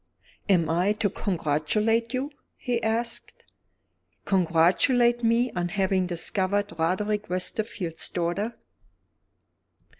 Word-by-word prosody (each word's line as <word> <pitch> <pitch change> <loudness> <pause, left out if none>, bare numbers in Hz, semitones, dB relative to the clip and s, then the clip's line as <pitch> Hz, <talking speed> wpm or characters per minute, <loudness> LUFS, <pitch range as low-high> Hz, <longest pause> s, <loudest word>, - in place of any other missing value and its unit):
"Am 175 -5 +4
I 175 +6 +2
to 210 -1 -1
congratulate 205 +7 0
you?" 265 +3 -2 0.2
he 240 -2 -2
asked. 230 +1 -2 0.8
"Congratulate 190 +8 +3
me 235 +2 +2
on 175 -1 -2
having 190 0 +1
discovered 190 +4 -1
Roderick 205 +5 0
Westerfield's 180 -2 -2
daughter." 180 +6 -2
200 Hz, 90 wpm, -26 LUFS, 175-230 Hz, 0.8 s, Am